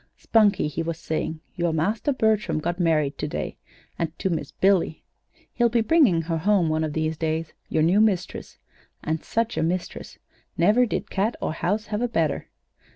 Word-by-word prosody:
"Spunkie," 215 -3 +3
he 150 +2 -3
was 165 -1 -3
saying, 160 -1 -3
"your 170 -1 0
master, 205 - 0
Bertram, 215 - +1
got 175 +3 -2
married 155 -5 +1
to - - -2
day - - -4 0.4
and 165 -1 -3
to 190 - -1
Miss 155 -4 -3
Billy. 190 -4 +1 0.5
He'll 240 -1 +3
be 235 0 +2
bringing 225 - +4
her 165 0 -2
home 190 -1 +2
one 155 0 0
of 155 -2 -2
these 155 0 -1
days 160 0 -2 0.2
your 155 - +2
new 185 +6 +4
mistress. 205 -5 -1 0.5
And 160 0 -2
such 230 +1 -1
a - - +1
mistress! 175 +2 -3 0.4
Never 215 +9 +4
did - - -3
cat 205 +5 0
or - - -2
house 205 +7 -1
have 210 - 0
a 245 - +1
better! 165 -10 -1
170 Hz, 180 wpm, -24 LUFS, 160-215 Hz, 0.5 s, bringing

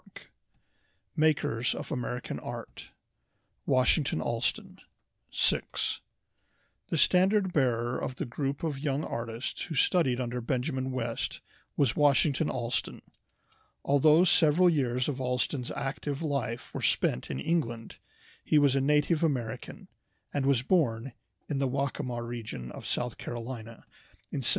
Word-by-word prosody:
] - - -43
MAKERS 145 -6 +2
OF - - -6
AMERICAN 125 -3 -3
ART - - -8 0.8
Washington 130 - +3
Allston 115 +8 -2 0.5
SIX - - 0 0.9
The 165 - -1
standard 190 +3 +4
bearer 120 -3 +1
of 130 - -4
the - - -3
group 135 +4 -3
of 150 -4 -2
young 140 0 -1
artists 115 0 -4
who 160 - -6
studied 135 -3 +3
under 125 0 -2
Benjamin 130 +2 -1
West 130 -3 -3 0.4
was 135 -4 +3
Washington 145 +1 +3
Allston. 120 0 -2 0.8
Although 150 +4 +5
several 175 0 +5
years 125 -5 0
of 135 -2 -2
Allston's 125 0 -1
active 140 +2 -3
life 130 -6 -3
were - - -4
spent 65 - +1
in 65 - -3
England, 120 - -2 0.5
he 155 - +3
was 140 -2 +4
a 135 - +3
native 150 +3 +2
American, 125 -6 -2 0.5
and 140 -1 0
was 130 -3 +3
born 135 -7 +1 0.3
in 145 -3 -2
the 135 - +2
Waccamaw 130 -2 -2
region 110 - -6
of - - -8
South 120 -1 -2
Carolina 115 -1 -7 0.5
in 140 - -2
1779. 120 - +2
130 Hz, 130 wpm, -29 LUFS, 120-150 Hz, 0.9 s, Although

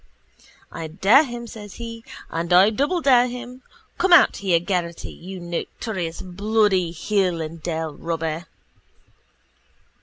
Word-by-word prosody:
I 165 - -6
dare 200 - +5
him, 240 -2 -7
says 210 -3 -10
he, 230 -1 -8 0.3
and 170 +1 -3
I 190 +4 +6
doubledare 275 - +3
him. 250 +1 -8 0.4
Come 375 - +2
out 345 - +7
here, 185 -4 +2
Geraghty, 175 -2 -3
you 185 +2 -9
notorious 175 +1 -5
bloody 195 -1 +1
hill 180 +1 0
and 160 +1 -6
dale 160 -2 -3
robber! 165 +2 -4
190 Hz, 120 wpm, -23 LUFS, 170-230 Hz, 0.4 s, out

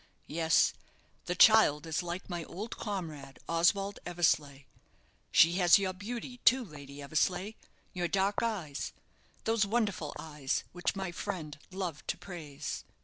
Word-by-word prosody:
Yes, 160 0 +3 0.5
the 180 - -1
child 195 -10 +6
is 160 +2 -1
like 175 +2 -5
my 175 -2 -4
old 210 +6 -6
comrade, 160 -10 -5
Oswald 195 +4 +2
Eversleigh. 155 -5 +1 0.7
She 165 +2 +6
has 175 -2 +7
your 190 -2 -1
beauty, 235 +5 -6
too, 255 +1 +4
Lady 145 -4 -10
Eversleigh, 180 +7 0 0.4
your 175 -2 -1
dark 195 +4 +1
eyes 185 -11 -3 0.5
those 225 -1 +2
wonderful 215 -2 -1
eyes, 150 -3 -2
which 175 +2 -2
my 190 -2 -3
friend 165 -6 -5
loved 180 -5 -4
to - - -1
praise." 160 -7 -6
175 Hz, 135 wpm, -31 LUFS, 155-200 Hz, 0.7 s, has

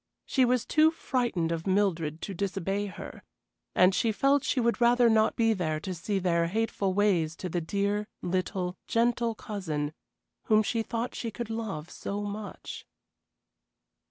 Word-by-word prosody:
She 260 -2 +3
was 245 -1 +1
too 310 0 +5
frightened 240 - -1
of 165 +2 -3
Mildred 170 -6 +1
to 200 - -4
disobey 195 +1 -2
her, 185 - -9 0.5
and 185 +1 +6
she 225 +4 +2
felt 275 +5 +3
she 265 - 0
would 235 -1 +1
rather 240 0 +5
not 220 0 +3
be 225 -1 +3
there 160 -6 -1
to 185 +4 -4
see 185 +4 -2
their 170 -3 +2
hateful 200 -1 -1
ways 180 -6 +2
to 180 - -5
the 175 +1 -1
dear, 200 +4 -1 0.2
little, 180 0 -1
gentle 235 0 +1
cousin 160 -9 -3 0.5
whom 215 0 +4
she 225 +2 0
thought 230 +2 -3
she 230 - -4
could 225 +1 -5
love 200 -8 -4
so 205 +1 -4
much. 205 -1 -7
205 Hz, 155 wpm, -29 LUFS, 180-230 Hz, 0.5 s, and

